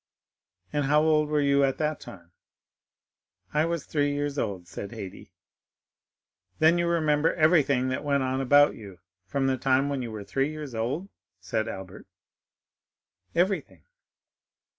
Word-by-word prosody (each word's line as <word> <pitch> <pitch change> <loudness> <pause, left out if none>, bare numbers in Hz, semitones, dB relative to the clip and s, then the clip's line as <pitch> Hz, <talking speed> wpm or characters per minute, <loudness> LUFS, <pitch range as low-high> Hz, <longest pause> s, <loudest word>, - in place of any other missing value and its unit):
"And 145 -1 0
how 150 +2 +4
old 155 -1 +3
were 150 0 +1
you 140 0 +3
at 135 -1 +1
that 155 -1 -1
time?" 85 -3 -12 1.2
"I 150 +1 +2
was 170 -3 -2
three 145 -2 0
years 145 0 -2
old," 95 -5 -3
said 100 +2 -7
Haydée. 105 -5 -9 1.3
"Then 160 +2 +4
you 170 - +1
remember 155 -2 +2
everything 145 -6 +3
that 130 - -3
went 140 -2 +1
on 130 +1 -1
about 145 +2 +5
you 100 -4 -11 0.3
from 140 -1 -1
the 135 -1 +1
time 135 +2 +2
when 140 -2 -2
you 120 - -4
were 105 -2 -6
three 135 +7 -1
years 155 -4 -7
old?" 125 +12 -2 0.3
said 110 +5 -2
Albert. 95 -4 -8 1.3
"Everything." 185 +3 0
140 Hz, 145 wpm, -27 LUFS, 125-150 Hz, 1.3 s, about